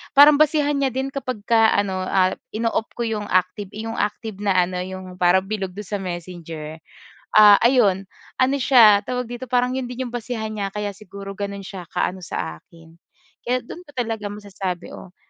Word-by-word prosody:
parang 290 +1 +8
basehan 295 -2 +3
niya 265 -3 0
din 265 +1 -2
kapagka 230 -4 +1
ano, 190 -2 -1
ah, 185 -1 +3 0.2
ino-off 225 0 0
ko 240 - -2
'yong 215 -3 -2
active 185 +2 0
'yong 225 +1 -5
active 210 0 -3
na 200 -2 +1
ano 180 0 -4
'yong 185 0 -7
parang 180 +1 +4
bilog 195 -2 -4
do'n 205 -2 -7
sa 205 -1 -3
Messenger. 170 -3 -7 0.5
Ah, 210 -1 +9
ayon, 225 -6 +4 0.3
ano 260 +1 +2
siya 230 -6 +7
tawag 250 0 -1
dito 245 +2 -7
parang 250 +1 +1
'yon 255 -1 -3
din 250 +1 -4
'yong 245 - -6
basehan 230 -2 -4
niya 205 -2 -3
kaya 205 +1 -4
siguro 200 -1 -10
gano'n 200 0 -5
siya 185 -3 -8
kaano 185 - -2
sa 80 - -5
akin. 165 - -19 0.6
Kaya 250 +1 0
do'n 350 +8 -11
ko - - -14
talaga 225 -4 -2
masasabi 200 -3 -5
o 185 0 -11
210 Hz, 180 wpm, -22 LUFS, 185-245 Hz, 0.6 s, Ah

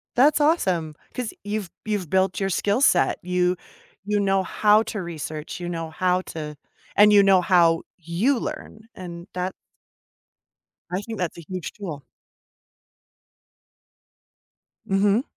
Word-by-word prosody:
That's 285 +5 +5
awesome 185 - +1 0.2
'cause 250 -3 -4
you've 205 -2 -3 0.2
you've 205 -6 -2
built 190 +1 +1
your 195 -1 0
skill 200 +6 +1
set. 180 -10 +4
You 180 0 +1 0.5
you 205 0 +1
know 195 -1 +2
how 210 +2 +4
to 210 -2 -4
research, 155 -2 -6
you 175 - -5
know 165 -2 -4
how 180 +2 +1
to 150 -2 -5 0.4
and 210 +1 +7
you 205 -1 +7
know 195 -2 +5
how 170 -2 +4
you 180 - 0
learn, 215 - -6
and 175 -1 -9
that 180 +1 -2 1.4
I 180 +2 -1
think 225 +1 -7
that's 175 -2 -2
a - - -8
huge 185 -3 -5
tool. 165 -9 -7 2.8
Mhm. 200 +4 +2
185 Hz, 135 wpm, -24 LUFS, 170-210 Hz, 2.8 s, and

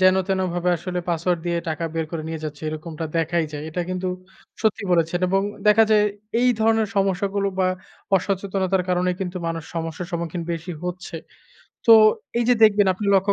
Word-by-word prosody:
যেন 185 0 +6
তেনো 190 -1 +1
ভাবে 175 0 0
আসলে 180 +2 -4
পাসওয়ার্ড 175 +1 0
দিয়ে 170 0 0
টাকা 160 +1 -2
বের 165 0 0
করে 165 -2 -4
নিয়ে 160 0 -4
যাচ্ছে 150 0 -6
এরকমটা 155 +1 -5
দেখাই 165 +1 +1
যায়। 145 -1 -5
এটা 160 +3 -3
কিন্তু 185 0 -2 0.6
সত্যি 220 -2 +1
বলেছেন, 170 0 +2
এবং 195 +1 +2 0.2
দেখা 210 +1 +7
যায় 210 -1 +5 0.4
এই 250 - +4
ধরনের 220 -1 +3
সমস্যাগুলো 195 +1 +1
বা 185 - +3 0.5
অসচেতনতার 190 0 0
কারণে 180 0 +1
কিন্তু 185 -1 -3
মানুষ 165 -1 -3
সমস্যার 165 +1 -4
সম্মুখীন 170 0 -3
বেশি 170 +2 -5
হচ্ছে। 180 -1 -5 0.7
তো - - +6 0.5
এই 240 - +1
যে, 245 - +6
দেখবেন 205 -2 +6
আপনি 200 +2 -4
লক্ষ্য 195 +1 +3
180 Hz, 175 wpm, -23 LUFS, 165-195 Hz, 0.7 s, দেখা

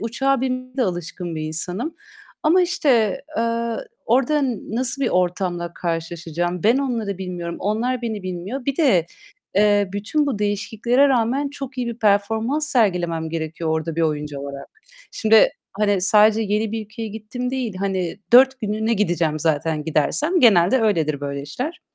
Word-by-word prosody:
uçağa 270 +4 0
binmeye 255 0 -3
de 260 - +2
alışkın 175 -2 -4
bir 155 - -4
insanım. 180 - -3 0.5
Ama 355 +4 +4
işte, 245 - +2
eee, 230 0 -1 0.3
orada 270 +5 +2 0.3
nasıl 260 +2 -1
bir 255 - +2
ortamla 180 -1 -1
karşılaşacağım 170 +1 -3
ben 235 +5 +4
onları 230 -8 -2
bilmiyorum. 175 -2 -5
Onlar 230 +5 -1
beni 220 -4 -3
bilmiyor. 185 +8 -5
Bir 275 0 -1
de, 210 - +3 0.5
eee, 205 0 +3
bütün 225 +9 0
bu 260 -7 -1
değişikliklere 220 +6 +1
rağmen 260 +3 +1
çok 275 -2 -8
iyi 245 - -1
bir 235 -1 -5
performans 220 +8 +1
sergilemem 175 - +1
gerekiyor 160 0 -3
orada 160 0 -2
bir 165 - +1
oyuncu 150 -2 -2
olarak. 140 0 -7 0.4
Şimdi, 220 0 +5 0.2
hani, 205 -1 +1
sadece 210 +3 +5
yeni 210 +1 -1
bir 225 -1 -3
ülkeye 220 +2 -7
gittim 220 +4 -5
değil, 255 -6 -3
hani, 190 -2 -2
4 260 +1 +7
günlüğüne 220 +1 0
gideceğim 170 -6 0
zaten 155 0 0
gidersem. 290 - +1
Genelde 210 - +5
öyledir 160 -10 +1
böyle 140 -1 -4
işler. 255 - -5
210 Hz, 150 wpm, -21 LUFS, 175-245 Hz, 0.5 s, 4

